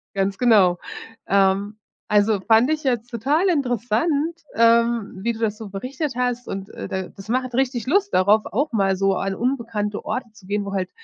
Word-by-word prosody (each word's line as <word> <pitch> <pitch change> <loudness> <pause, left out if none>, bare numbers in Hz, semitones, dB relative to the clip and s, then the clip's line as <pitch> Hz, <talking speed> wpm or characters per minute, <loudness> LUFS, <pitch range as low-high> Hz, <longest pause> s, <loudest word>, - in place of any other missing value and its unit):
Ganz 195 0 0
genau. 200 -8 +4 0.5
Ähm, 200 +2 +2 0.3
also 210 0 +3
fand 225 +7 +4
ich 310 -1 -1
jetzt 245 -3 -1
total 280 - +1
interessant, 280 - 0
ähm, 230 -1 +3
wie 235 +3 0
du 220 - -9
das 215 -2 -1
so 220 -2 -8
berichtet 260 +9 -4
hast 245 -1 -1
und 195 0 -5
äh - - -7
da 190 0 -3
das 195 +2 -13
macht 255 +1 -1
richtig 250 -2 0
Lust 395 +8 +1
darauf, 205 +4 +4
auch 285 +8 -1
mal 195 -4 +2
so 195 0 +2
an 195 0 -2
unbekannte 230 -4 -2
Orte 250 -3 -4
zu 200 -3 -17
gehen, 205 0 -1
wo 200 - -5
halt 185 -2 -2
225 Hz, 185 wpm, -22 LUFS, 200-255 Hz, 0.5 s, genau